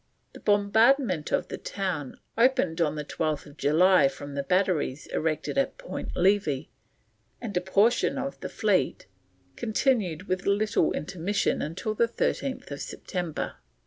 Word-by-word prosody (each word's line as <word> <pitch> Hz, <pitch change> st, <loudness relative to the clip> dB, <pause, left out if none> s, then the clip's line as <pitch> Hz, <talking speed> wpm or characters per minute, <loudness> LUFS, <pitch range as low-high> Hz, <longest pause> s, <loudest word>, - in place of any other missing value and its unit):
The -, -, -11 dB
bombardment 205 Hz, -, +3 dB
of -, -, 0 dB
the -, -, -5 dB
town 185 Hz, -8 st, -4 dB, 0.2 s
opened 230 Hz, -9 st, +2 dB
on 155 Hz, -2 st, +1 dB
12th 150 Hz, -1 st, -3 dB
July 160 Hz, +2 st, +5 dB
from 140 Hz, +1 st, -7 dB
the 140 Hz, -, -1 dB
batteries 165 Hz, -4 st, 0 dB
erected 160 Hz, -, 0 dB
at 275 Hz, -, -1 dB
Point -, -, -6 dB
Levi 180 Hz, -7 st, +2 dB, 0.8 s
and 220 Hz, -5 st, -6 dB
a 180 Hz, -, +2 dB
portion 210 Hz, +9 st, +2 dB
of 275 Hz, +1 st, -4 dB
the -, -, -5 dB
fleet, 195 Hz, -, 0 dB, 0.4 s
and 90 Hz, -, -35 dB
continued 215 Hz, -, 0 dB
with 185 Hz, 0 st, -2 dB
little 205 Hz, -4 st, +2 dB
intermission 165 Hz, -1 st, -1 dB
till 215 Hz, +4 st, -3 dB
13th 235 Hz, -, -1 dB
September. 175 Hz, -4 st, -4 dB
185 Hz, 130 wpm, -27 LUFS, 155-215 Hz, 0.8 s, July